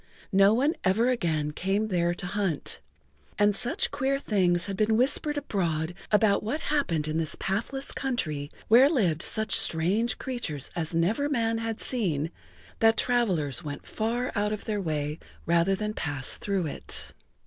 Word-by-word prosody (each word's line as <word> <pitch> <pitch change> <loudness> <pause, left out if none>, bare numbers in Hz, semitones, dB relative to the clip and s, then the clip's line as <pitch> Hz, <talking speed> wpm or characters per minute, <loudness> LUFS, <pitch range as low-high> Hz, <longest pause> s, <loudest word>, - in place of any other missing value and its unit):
No 195 +1 +6
one 280 +6 +2
ever 225 +7 +3
again 160 -10 0
came 195 +7 -1
there 175 -2 +1
to 185 - -6
hunt, 190 -5 -2 0.6
and 205 -1 +3
such 240 - 0
queer 270 +1 0
things 180 -9 +1
had 195 - -4
been 215 +2 +2
whispered 290 +4 +1
abroad[Pg 175 - -1
45] - - -25 0.2
about 210 -1 +4
what 245 +9 -2
happened 190 - 0
in 155 +1 -1
this 160 -2 -1
pathless 235 +8 -2
country, 155 - -2 0.2
where 250 +5 +7
lived 185 - +1
such 220 +2 +1
strange 190 +9 +2
creatures 180 - -3
as 165 -1 -3
never 215 +13 +1
man 230 -5 0
had 225 -1 -4
seen, 165 - +1 0.5
that 225 0 +4
travelers 185 - +1
went 145 -1 -6
far 235 +3 -2
out 210 0 0
of 215 - -4
their 210 -2 -1
way 150 -3 -2 0.3
rather 170 +3 +3
than 210 +2 -3
pass 145 -8 -1
through 195 -4 -1
it. 150 - -4
200 Hz, 160 wpm, -27 LUFS, 165-230 Hz, 0.6 s, where